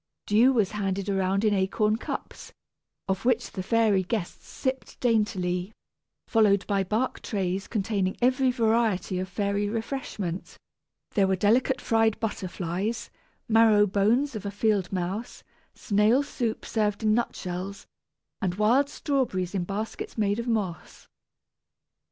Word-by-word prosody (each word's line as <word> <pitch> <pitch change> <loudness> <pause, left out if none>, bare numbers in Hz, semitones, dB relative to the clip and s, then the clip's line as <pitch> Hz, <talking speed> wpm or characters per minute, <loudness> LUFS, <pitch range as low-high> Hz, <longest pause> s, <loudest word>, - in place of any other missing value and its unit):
Dew 230 +6 +5
was 215 -7 +1
handed 200 -1 -2
around 195 +1 +1
in 210 - +3
acorn 210 +3 +1
cups, - - -7 0.5
of 190 -1 -1
which 245 -1 +1
the 190 - -4
fairy 215 -1 +3
guests 185 -1 -4
sipped 260 -1 -4
daintily, 205 -5 0 0.5
followed 205 -4 +3
by 200 -2 +1
bark 220 +7 -1
trays 190 -2 -2
containing 200 -3 -1
every 255 +1 +3
variety 225 -6 +1
of 185 0 -4
fairy 200 +1 -1
refreshment. 220 -6 -4 0.5
There 195 -2 +3
were 190 - +2
delicate 235 +7 +2
fried 225 -1 +2
butterflies, 195 0 -3 0.4
marrow 220 -2 +5
bones 220 +8 +1
of 210 - -5
a 200 - -3
field 205 -3 0
mouse, 190 +5 -4 0.3
snail 215 +6 +3
soup 240 -5 -3
served 210 -1 -1
in 215 -1 +3
nutshells, 195 -4 -3 0.6
and 180 -3 -1
wild 240 +8 +3
strawberries 240 -14 -1
in 185 -3 -1
baskets 210 +5 -5
made 205 0 +1
of 235 - -4
moss. 200 -8 -3
210 Hz, 130 wpm, -27 LUFS, 190-230 Hz, 0.6 s, Dew